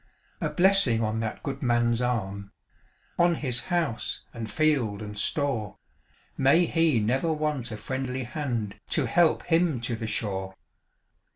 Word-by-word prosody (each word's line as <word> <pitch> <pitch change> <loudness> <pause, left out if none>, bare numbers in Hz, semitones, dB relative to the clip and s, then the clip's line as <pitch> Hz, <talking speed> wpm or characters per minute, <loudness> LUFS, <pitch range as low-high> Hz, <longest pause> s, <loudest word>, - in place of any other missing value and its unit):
A - - 0
blessing 180 - +4
on 110 +1 -1
that 110 -1 -4
good 135 -1 -4
man's 120 -1 +2
arm, 100 -5 -2 0.7
On 175 0 +4
his 130 -5 -2
house, 170 -10 -1
and 115 -2 -6
field, 135 -10 +1
and 105 -1 -7
store; 115 -1 -1 0.6
May 140 +6 +4
he 165 -6 +2
never 130 +9 +1
want 150 -6 -2
a 110 - -5
friendly 130 +1 -3
hand 120 -6 -3
To 150 - +1
help 165 +7 +3
him 165 -5 +2
to 115 0 -2
the 110 0 -5
shore! 95 -3 -2
125 Hz, 145 wpm, -27 LUFS, 110-155 Hz, 0.7 s, blessing